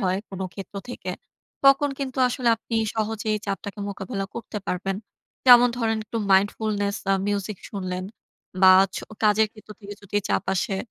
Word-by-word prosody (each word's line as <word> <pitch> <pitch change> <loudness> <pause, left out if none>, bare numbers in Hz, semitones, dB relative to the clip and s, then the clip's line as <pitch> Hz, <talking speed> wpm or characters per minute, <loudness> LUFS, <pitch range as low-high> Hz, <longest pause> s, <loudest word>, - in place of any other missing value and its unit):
হয় 185 -2 +1
কোন 190 -1 -7
ক্ষেত্র 195 0 -9
থেকে। 245 - -5 0.5
তখন 275 +1 +6
কিন্তু 265 -2 -4
আসলে 245 -1 -1
আপনি 230 +1 -4 0.2
সহজেই 215 -1 -1
চাপটাকে 200 +1 -4
মোকাবেলা 195 0 -4
করতে 225 -2 -5
পারবেন। 195 +1 -2 0.5
যেমন 245 0 +9
ধরেন, 225 -2 0
একটু 230 +2 -4
mindfulness 205 +1 +1 0.2
আ - - +4
মিউজিক 205 -1 -2
শুনলেন 185 -2 -4 0.6
বা, 185 0 +9 0.2
ছো - - -5 0.2
কাজের 215 +1 +4
ক্ষেত্র 215 -1 -16
থেকে 205 0 -8
যদি 200 +1 -4
চাপ - - 0
আসে, 190 +1 -1
205 Hz, 155 wpm, -24 LUFS, 195-225 Hz, 0.6 s, যেমন